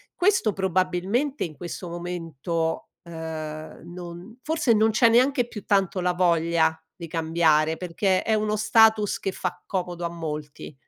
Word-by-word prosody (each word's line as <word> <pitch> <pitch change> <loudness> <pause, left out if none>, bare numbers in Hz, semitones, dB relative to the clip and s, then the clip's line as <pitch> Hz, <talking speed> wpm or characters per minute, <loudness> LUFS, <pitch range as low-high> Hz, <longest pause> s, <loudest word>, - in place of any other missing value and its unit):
Questo 360 - +2
probabilmente 190 - 0
in 155 -3 -5
questo 175 +1 -6
momento, 165 -2 -3
uhm, 160 -2 -7
non 180 +6 -9
forse 310 -5 +1
non 220 +1 +3
c'è 230 +2 +5
neanche 250 +1 +3
più 210 -4 -8
tanto 195 -2 +1
la 180 0 +1
voglia 165 -2 +2
di 170 - -8
cambiare, 160 -1 +2
perché 185 +2 0
è 220 - +1
uno 215 0 0
status 215 -1 +4
che 195 - -2
fa 180 -1 -4
comodo 175 -2 -3
a 170 - -1
molti. 150 -3 -6
180 Hz, 145 wpm, -25 LUFS, 165-215 Hz, -, c'è